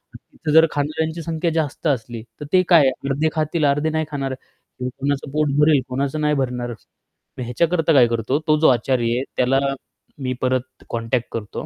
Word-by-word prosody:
तर - - -7
तिथं 155 - -4
जर 160 0 +8
खाणाऱ्यांची 160 +3 -2
संख्या 165 +1 -1
जास्त 155 -1 -2
असली 120 -4 -2 0.2
तर - - -4
ते 185 - +6
काय 170 -3 +7
आहे 135 - +5 0.2
अर्धे 150 +4 +1
खातील, 155 0 -1
अर्धे 145 +3 +2
नाही 160 0 -1
खाणार. 135 -2 -2
किंवा 125 -1 -9
कोणाचं 140 +1 -2
पोट 150 0 +1
भरेल, 150 -2 +5
कोणाचं 140 +4 -2
नाही 150 0 +2
भरणार, 125 -2 -2
असं. 110 - -12 0.5
तर 125 - -4
ह्याच्याकरता 165 +6 +1
काय 125 -4 +6
करतो, 115 +4 0
तो 155 0 +4
जो 160 - +5
आचारी 120 -1 +1
आहे 130 - -1
त्याला 130 +2 +3 0.6
मी 130 -1 -2
परत 130 0 -2
कॉन्टॅक्ट 115 +1 -1
करतो. 105 -2 -5
140 Hz, 190 wpm, -21 LUFS, 125-155 Hz, 0.6 s, जर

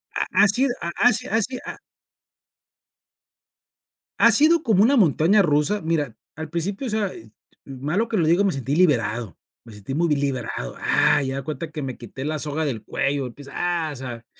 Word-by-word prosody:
Ha - - +1
ha 200 +3 +5
sido 245 +6 +1
ha 170 - -3
ha 245 - +4
si 245 +5 +1
ha 225 -5 +1
si 255 +4 -3
ha - - -7 2.4
Ha 235 - +7
sido 310 +6 +4
como 210 -4 +3
una 270 +5 +4
montaña 185 - +4
rusa. 165 +4 +1
Mira, 160 -6 -1 0.2
al 160 +1 -7
principio, 195 - -3
o - - -3
sea, 215 -1 0
eh, 110 -1 -13 0.3
malo 150 - -2
que 220 - -1
lo 165 -4 +2
digo, 175 +5 +3
me 200 - +2
sentí 135 -1 -3
liberado, 115 - +1 0.3
me 115 - -14
sentí 105 +5 -8
muy 165 +1 +1
liberado, 130 - -3
¡ah!, 145 - +3
y 135 - -3
haga 135 - -4
de - - -7
cuenta 155 +1 -5
que 150 - -5
me 130 -3 -5
quité 130 +3 -8
la 155 +1 -2
soga 155 +1 -2
del 115 -7 -3
cuello, 135 -1 -2
quizá, 140 +1 -13 0.3
ah, - - -4
o - - -9
sea, 120 -3 -8
155 Hz, 200 wpm, -23 LUFS, 135-205 Hz, 2.4 s, Ha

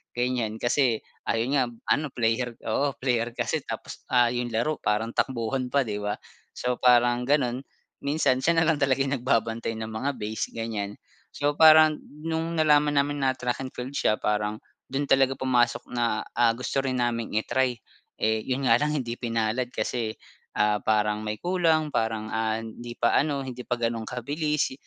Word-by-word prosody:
ganiyan 120 -3 -1
kasi 120 -2 +1 0.3
ayun 115 +3 0
nga 135 -3 +4 0.3
ano 150 +1 -1
player 120 0 0
oo 140 +5 0
player 120 -2 0
kasi - - -1
tapos - - -6
ah, 120 -1 +4
yung 120 0 -1
laro 150 +6 0
parang 105 +2 0
takbuhan 125 +1 -1
pa 140 +1 +2
'di 105 -4 -4
ba? 105 0 -1 0.4
So, 125 -1 -2
parang 120 0 +4
ganun, 130 -4 +2 0.4
minsan 140 -3 +1
siya 165 +5 +2
nalang 160 -2 +2
talaga 135 -1 +2
yung 135 - -1
nagbabantay 115 -2 0
ng 110 0 -5
mga 135 +6 -2
base 110 +1 -3
ganiyan. 105 -3 -3 0.3
So, 145 0 -1
parang 155 0 +7 0.2
nung 165 +1 -2
nalaman 150 -2 +4
namin 145 0 +1
na 130 -1 +1
track 125 +1 -2
and 130 - -4
field 125 +2 -6
siya 105 -6 +1
parang 105 0 -1 0.3
dun 135 +2 -1
talaga 135 -1 +3
pumasok 125 -2 +1
na, 120 -3 0
ah, 120 -1 +4
gusto 135 +2 -1
rin 130 -1 -2
naming 115 -3 -1
i-try, 125 +2 0 0.4
eh, 110 0 +1
yun 135 +1 -2
nga 120 +2 +4
lang 150 0 +1
hindi 120 -4 -3
pinalad 115 +1 -1
kasi, 115 -3 -3 0.4
ah, 105 -1 +2
parang 105 -1 +1
may 105 0 -3
kulang, 165 -4 +1
parang, 110 -1 -1
ah, 110 0 0
hindi 120 +1 -8
pa 120 - +2
ano, 140 -2 +1
hindi 125 -1 -6
pa 125 -1 -2
ganun 115 -1 -2
kabilis. 145 +4 -1
125 Hz, 170 wpm, -26 LUFS, 115-140 Hz, 0.4 s, parang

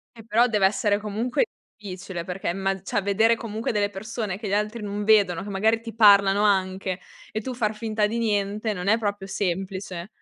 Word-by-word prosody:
Eh 225 - -13
però 230 +2 +3
deve 210 -5 +2
essere 205 +1 +2
comunque 225 - -1 0.3
difficile, 185 -3 -6
perché 180 0 -4
imma 195 +1 -1
cioè 200 +1 -1
vedere 220 +4 +3
comunque 225 0 -3
delle 205 -1 +1
persone 205 -1 -4
che 215 - -6
gli 195 - -2
altri 210 +2 -1
non 205 0 -3
vedono, 200 -5 +3
che 205 - -7
magari 220 +3 +1
ti 230 -2 -8
parlano 200 -2 +6
anche 190 -2 +1 0.3
e 215 - -3
tu 255 +3 -5
far 220 -3 -1
finta 215 -1 0
di 230 +2 -3
niente, 210 -1 0
non 180 0 -5
è 220 - +5
proprio 205 -3 -3
semplice. 190 -1 -3
205 Hz, 195 wpm, -25 LUFS, 195-220 Hz, 0.3 s, parlano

